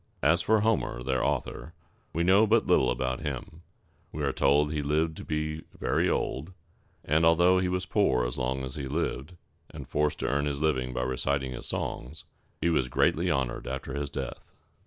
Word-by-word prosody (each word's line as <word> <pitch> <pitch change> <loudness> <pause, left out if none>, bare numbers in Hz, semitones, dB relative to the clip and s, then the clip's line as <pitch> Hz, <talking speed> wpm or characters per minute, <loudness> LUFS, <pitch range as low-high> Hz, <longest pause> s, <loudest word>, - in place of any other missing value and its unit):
As 85 +5 +4
for 110 +4 +3
Homer, 105 - 0
their 65 -1 0
author, 80 +8 -2 0.4
we 85 - 0
know 100 +5 +5
but 115 +1 +3
little 75 -8 +4
about 65 +1 -1
him. 75 +2 -6 0.5
We - - -4
are - - 0
told 75 +2 +3
that - - -4
he 75 - -1
lived 80 +3 0
to - - -7
be 75 0 -2 0.2
very - - +1
old, 80 +8 -2 0.5
and 75 +3 +2
that - - +6
although 85 +3 +5
he 90 0 0
was 90 0 -1
poor 65 - +2
as - - -3
long 65 +1 -1
as 65 0 -5
he 70 -3 -5
lived, 75 +2 -3 0.3
and - - -9
forced 75 0 0
to - - 0
earn 70 +2 +1
his 70 -1 -2
living 65 -5 0
by 60 - -2
reciting 65 +1 -1
his 65 - -6
songs, 70 +7 -4 0.3
he 85 - +1
was 65 -6 +1
greatly - - +2
honored 65 -3 -1
after 65 0 -4
his 70 0 -3
death. - - -5
75 Hz, 200 wpm, -28 LUFS, 65-85 Hz, 0.5 s, that